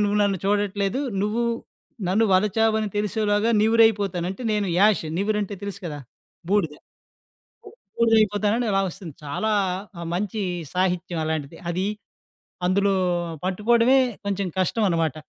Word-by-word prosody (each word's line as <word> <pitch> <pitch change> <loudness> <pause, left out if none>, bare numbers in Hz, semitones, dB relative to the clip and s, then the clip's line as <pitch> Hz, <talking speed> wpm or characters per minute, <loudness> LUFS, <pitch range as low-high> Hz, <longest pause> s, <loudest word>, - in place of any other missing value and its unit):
నువ్వు 205 0 +1
నన్ను 200 -2 +1
చూడట్లేదు, 205 +3 0 0.2
నువ్వు 215 +3 0 0.7
నన్ను 215 +5 +3
వలచావు 215 +3 +3
అని 215 - -1
తెలిసేలోగా 210 +1 +1
నివురు 225 +1 +5
అయిపోతాను. 195 -5 -1
అంటే 220 +6 -7
నేను 210 -2 0
యాష్ 210 0 +4 0.2
నివురు 210 +2 0
అంటే 205 +1 -5
తెలుసు 200 0 -6
కదా? 150 -2 -5 0.5
బూడిద. 180 -8 +2 1.2
బూడిద 230 -1 +3
అయిపోతానని 215 +3 +1
అలా 195 0 +2
వస్తుంది. 165 -4 -10
చాలా 215 +10 -1 0.5
ఆహ్, 170 - -5
మంచి 205 +3 -2 0.3
సాహిత్యం 180 -2 0
అలాంటిది. 155 -3 -3
అది 185 +3 -1 0.8
అందులో 195 +1 +2 0.5
పట్టుకోవడమే 230 +7 +3 0.3
కొంచెం 200 -1 -1
కష్టం 210 +4 +1
అనమాట. 165 -4 0
200 Hz, 130 wpm, -24 LUFS, 185-215 Hz, 1.2 s, నివురు